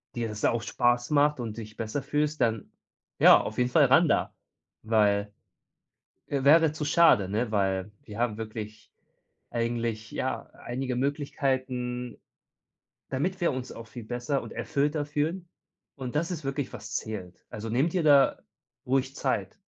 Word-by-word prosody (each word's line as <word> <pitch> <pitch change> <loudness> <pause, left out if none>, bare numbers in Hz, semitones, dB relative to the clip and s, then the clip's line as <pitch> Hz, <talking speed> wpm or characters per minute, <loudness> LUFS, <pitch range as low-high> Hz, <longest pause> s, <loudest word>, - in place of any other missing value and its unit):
dir 120 -1 -1
das 105 -1 -3
auch 115 -1 +2
Spaß 120 +1 +1
macht 150 -1 +3
und 115 -2 -5
dich 110 -1 -9
besser 115 +5 -3
fühlst, 150 +1 -1
dann 115 -3 0 0.5
ja, - - +8
auf 110 - -6
jeden 125 0 +1
Fall 150 0 +6
ran 155 +6 +5
da, - - +1 0.5
weil 105 -2 +2 0.9
wäre 145 +3 +4
zu 155 -1 -4
schade, 145 - +5
ne, 110 +2 -1
weil 95 -1 0
wir 105 +2 -9
haben 115 -3 0
wirklich 110 -1 -7 0.6
eigentlich 115 -1 -2
ja 130 - -3
einige 125 +1 -4
Möglichkeiten, 130 -3 -2 0.9
damit 180 +8 -1
wir 170 - +3
uns 130 0 -5
auch 115 -1 -9
viel 120 0 -9
besser 120 +4 -2
und - - -9
erfüllter 145 +1 -1
fühlen. 160 +5 -2 0.5
Und 130 -2 -6
das 170 +3 -1
ist 160 -4 -5
wirklich, 135 0 -2
was 110 +1 -7
zählt. 95 -5 -6
Also 110 +1 -6
nimm 130 +8 +2
dir 175 0 -1
da 140 -3 +5 0.5
ruhig 135 +1 0
Zeit. - - -2
125 Hz, 150 wpm, -28 LUFS, 110-145 Hz, 0.9 s, ja